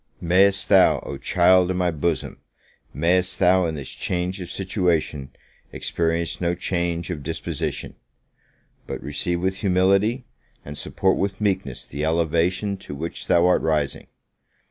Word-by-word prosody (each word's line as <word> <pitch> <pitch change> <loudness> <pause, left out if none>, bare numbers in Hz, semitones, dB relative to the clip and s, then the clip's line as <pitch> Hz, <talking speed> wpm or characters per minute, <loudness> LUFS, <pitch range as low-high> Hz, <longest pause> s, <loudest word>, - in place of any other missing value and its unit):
May'st 95 +3 +3
thou, 95 -2 +5
O - - -6
child 90 0 +4
of 95 - -1
my 90 -1 +1
bosom! 80 +1 -2 0.5
may'st 90 +6 +1
thou, 90 0 +4
in 80 - -3
this 70 -3 -6
change 90 +1 -3
of 90 - -7
situation, 90 -8 -1 0.4
experience 85 +1 -2
no 85 0 +1
change 85 -1 -2
of 80 -4 -5
disposition! 80 +4 -4 0.9
but - - -4
receive 85 +5 -2
with 95 0 0
humility, 100 +6 +2 0.4
and 75 - -7
support 95 +5 0
with 95 0 -2
meekness 95 - -1
the 70 +2 -5
elevation 85 +5 +1
to 70 - -8
which 80 +4 -5
thou 85 0 +4
art 90 - +3
rising! 75 -3 -1
90 Hz, 140 wpm, -23 LUFS, 80-95 Hz, 0.9 s, thou